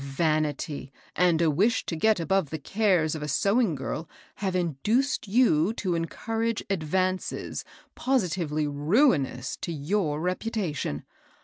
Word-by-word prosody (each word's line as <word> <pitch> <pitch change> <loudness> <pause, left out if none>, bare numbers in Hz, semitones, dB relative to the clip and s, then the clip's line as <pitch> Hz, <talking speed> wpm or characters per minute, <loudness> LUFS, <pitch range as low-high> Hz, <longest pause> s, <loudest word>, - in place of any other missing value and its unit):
Vanity 150 -1 -1 0.2
and 170 -1 +3
a 160 - +4
wish 205 +10 +2
to 165 - -3
get 215 +5 +3
above 170 -1 +1
the 160 - -3
cares 180 -1 +1
of 155 - -5
a 150 - -3
sewing 200 +2 +2
girl 145 +4 -4 0.3
have 190 -2 -2
induced 210 - 0
you 200 -5 +3
to 195 -5 -2
encour 225 +7 -1
age 230 - -2
advances 185 +2 -1 0.3
positively 175 - 0
ruinous 145 - +1
to 170 - -4
your 155 0 -1
reputar 185 +1 -2
tion." 75 - -3
175 Hz, 135 wpm, -27 LUFS, 150-205 Hz, 0.3 s, a